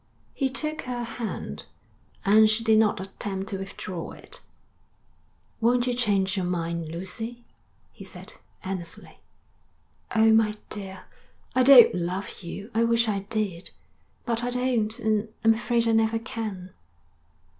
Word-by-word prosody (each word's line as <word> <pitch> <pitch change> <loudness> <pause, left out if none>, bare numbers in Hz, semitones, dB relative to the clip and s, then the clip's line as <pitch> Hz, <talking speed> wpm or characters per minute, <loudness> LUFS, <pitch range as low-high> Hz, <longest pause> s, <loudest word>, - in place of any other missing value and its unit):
He 270 -2 0
took 305 +3 -2
her 245 -1 -3
hand, 230 -1 -5 0.6
and 215 +2 +6
she 215 +1 +1
did 220 -1 +5
not 215 -3 +3
attempt 195 0 -4
to 195 - -4
withdraw 185 -3 -6
it. - - -7 1.2
'Won't 240 +1 +3
you 250 - 0
change 200 -5 +1
your 185 -2 -1
mind, 170 -2 -2
Lucy?' 225 +8 -5 0.5
he - - -12
said - - -9 0.3
earnestly. 180 -3 -6 1.0
'Oh, 220 0 +6
my 220 -1 +4 0.2
dear, 190 -2 -6 0.5
I 255 - +3
don't 255 -2 +9
love 180 +3 -3
you. 200 +5 -7
I 225 +1 +3
wish 230 0 +3
I 200 -2 -2
did. 200 -5 -2 0.6
But 235 -1 -1
I 245 - 0
don't 245 -3 0
and 220 -2 0
I'm 225 0 +6
afraid 235 0 0
I - - +3
never 225 0 +3
can.' 215 -6 -5
220 Hz, 140 wpm, -26 LUFS, 190-235 Hz, 1.2 s, don't